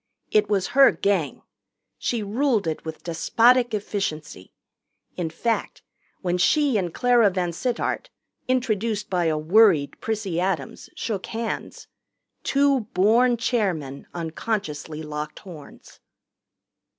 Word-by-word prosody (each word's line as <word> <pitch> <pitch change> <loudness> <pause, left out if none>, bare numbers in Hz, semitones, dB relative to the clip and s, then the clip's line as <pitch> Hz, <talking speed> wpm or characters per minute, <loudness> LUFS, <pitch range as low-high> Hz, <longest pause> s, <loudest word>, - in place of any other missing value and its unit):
It 210 -1 +3
was 195 -3 +1
her 270 0 +7
Gang. 195 -7 -1 0.6
She 235 -3 -1
ruled 225 0 +1
it 160 -1 -3
with 160 0 -7
despotic 240 +8 +3
efficiency. 155 - -4 0.6
In 170 -3 -2
fact, 225 +8 -2 0.4
when 180 -1 -1
she 285 - +3
and 180 -5 0
Clara 240 0 +4
VanSittart, 185 +6 -2 0.4
introduced 225 -5 -1
by 180 -2 +1
a 155 -1 +1
worried 165 -2 +3
Prissy 210 -6 -2
Adams, 175 -7 -3
shook 205 -5 -4
hands, 225 0 -5 0.6
two 280 -1 +2 0.2
born 235 +6 +4
chairmen 185 - -2
unconsciously 160 -3 -4
locked 150 0 -5
horns. 165 -7 -13
200 Hz, 110 wpm, -24 LUFS, 165-230 Hz, 0.6 s, her